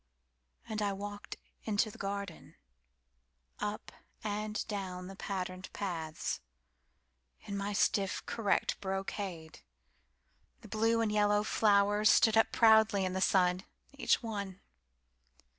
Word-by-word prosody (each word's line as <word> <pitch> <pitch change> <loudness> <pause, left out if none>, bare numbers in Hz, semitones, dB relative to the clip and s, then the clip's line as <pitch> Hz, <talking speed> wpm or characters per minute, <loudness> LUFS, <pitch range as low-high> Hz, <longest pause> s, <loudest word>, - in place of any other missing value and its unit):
And 215 -1 -3
I 200 -1 +1
walked 205 +1 -7 0.3
into 215 0 +1
the - - -14
garden, 200 -3 -5 1.0
Up 210 +1 -4 0.3
and 210 0 -3
down 190 -4 -4
the 195 +1 -8
patterned 185 -2 -5
paths, 165 -5 -3 1.0
In 200 - -6
my 200 +1 -2
stiff, 195 -1 +1
correct 215 -4 0
brocade. 190 -4 -4 1.0
The 220 - -13
blue 225 +2 +2
and 220 -2 +1
yellow 210 0 +3
flowers 205 -1 +3
stood 225 -1 +5
up 225 - +4
proudly 220 -3 +5
in 185 - -2
the 190 - -2
sun, 180 -1 +3 0.3
Each 280 -2 +1
one. 200 -4 -4
205 Hz, 115 wpm, -32 LUFS, 190-215 Hz, 1.0 s, stood